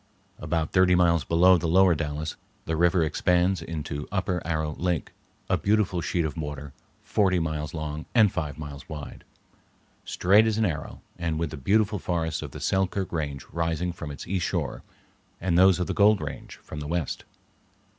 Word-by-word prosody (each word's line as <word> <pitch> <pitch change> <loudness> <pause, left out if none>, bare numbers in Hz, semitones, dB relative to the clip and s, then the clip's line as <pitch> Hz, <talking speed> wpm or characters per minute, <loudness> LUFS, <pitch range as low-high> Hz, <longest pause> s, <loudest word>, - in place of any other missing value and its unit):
About 80 +1 -1
thirty 95 -1 +4
miles 85 -3 +3
below 90 +3 +5
the 85 - -2
Lower 95 +2 +5
Dalles 75 0 -3 0.3
the 80 - -1
river 85 +1 +3
expands 90 +3 +1
into 75 -3 -5
Upper 90 -2 -1
Arrow 80 -2 -1
Lake, 85 -3 -1 0.4
a - - +1
beautiful 100 -4 +1
sheet 85 0 0
of 75 - -3
water 75 -3 -6 0.3
forty 95 -3 +2
miles 80 -1 -3
long 75 -1 -5
and 110 -5 +6
five 75 -5 -3
miles 75 -2 -8
wide, 75 -2 -8 0.8
straight 100 +5 +4
as 110 -1 0
an 110 - +2
arrow 80 -6 -4 0.2
and 85 -2 -1
with 80 -2 -2
the - - -5
beautiful 105 +8 +2
forests 85 -3 -2
of - - -6
the - - -9
Selkirk 95 0 0
range 70 -5 -3
rising 85 +1 -1
from 75 - -7
its 70 - -7
east 95 -1 -1
shore, - - -2 0.6
and 90 -1 0
those 95 0 +6
of 90 - 0
the - - -2
Gold 105 0 +5
range 75 -2 -7
from 75 - -7
the 75 - -5
west. 85 -2 -2
85 Hz, 175 wpm, -26 LUFS, 75-95 Hz, 0.8 s, and